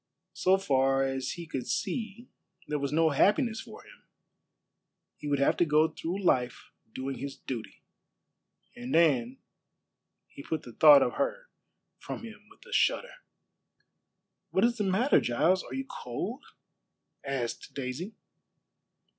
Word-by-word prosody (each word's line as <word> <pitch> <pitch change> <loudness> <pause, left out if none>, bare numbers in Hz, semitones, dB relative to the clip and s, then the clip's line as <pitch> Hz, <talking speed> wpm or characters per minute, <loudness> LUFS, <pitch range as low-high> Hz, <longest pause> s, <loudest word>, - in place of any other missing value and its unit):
So 190 +1 +3
far 135 -6 +2
as 135 -1 -2
he 170 -1 -7
could 135 -5 -5
see 230 0 -3 0.4
there 150 0 -1
was 140 -1 -2
no 160 +1 +3
happiness 220 - +2
for - - -12
him. - - -17 1.1
He 150 - -8
would 145 -1 +1
have 140 - +3
to - - +4
go 155 +1 +3
through 175 +5 -5
life 125 -8 0 0.2
doing 130 +3 -5
his 140 0 -5
duty. 120 -4 -7 0.9
And 245 +2 -4
Anne 135 -7 +3 0.9
he - - -11
put 155 +1 -4
the 120 - -11
thought 145 -1 +8
of 125 - -1
her - - -2 0.5
from - - -7
him 215 -2 -11
with - - -20
a 485 - -10
shudder. - - +1 1.4
"What 190 +4 +3
is 240 0 +1
the 210 - 0
matter, 205 +9 +3
Giles? 170 +10 +2
Are - - -8
you 270 0 -3
cold?" 215 - -5 0.8
asked 135 -4 -4
Daisy. 140 - -5
160 Hz, 140 wpm, -29 LUFS, 135-215 Hz, 1.4 s, thought